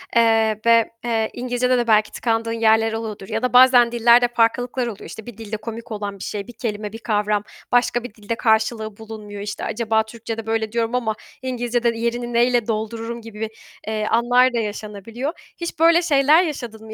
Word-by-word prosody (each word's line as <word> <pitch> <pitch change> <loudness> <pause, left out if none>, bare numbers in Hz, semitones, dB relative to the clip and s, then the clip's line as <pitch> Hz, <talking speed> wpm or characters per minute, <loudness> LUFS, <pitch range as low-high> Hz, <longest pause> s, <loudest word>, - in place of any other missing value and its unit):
eee, 225 -2 +3
ve, 230 -1 +4
eee, 225 -2 0
İngilizcede 250 0 0
de 240 -1 0
belki 215 -1 +3
tıkandığın 230 -1 -1
yerler 225 0 +3
oluyordur 220 -3 -5
ya 220 0 -2
da 250 0 -1
bazen 250 -2 +7
dillerde 240 +1 +5
farklılıklar 245 +2 +1
oluyor. 210 -4 -7
İşte, 220 - -9
bir 240 -3 -10
dilde 220 -1 -5
komik 230 +2 -8
olan 205 -2 -5
bir - - -7
şey, 200 -2 -5
bir 240 - -10
kelime, 210 -3 -4
bir 225 - -7
kavram 210 -2 0 0.3
başka 240 0 +2
bir 245 - -8
dilde 215 +1 -4
karşılığı 220 -1 0
bulunmuyor. 215 -2 -9
İşte, 205 0 -5
acaba 220 -1 0
Türkçe'de 225 0 -7
böyle 225 -1 -1
diyorum 230 +1 -1
ama 220 -4 -1 0.3
İngilizce'de 245 -2 0
yerini 240 +1 -2
neyle 240 -1 +2
doldururum 225 +2 -3
gibi 225 -1 -11
bir, 220 0 -3 0.4
eee, 215 -1 -1
anlar 245 +3 +3
da - - 0
yaşanabiliyor. 215 - -5 0.2
Hiç 340 -2 -6
böyle 335 +1 +6
şeyler 300 +1 +4
yaşadın 240 -9 -6
mı? 220 - -8
230 Hz, 185 wpm, -21 LUFS, 220-240 Hz, 0.4 s, bazen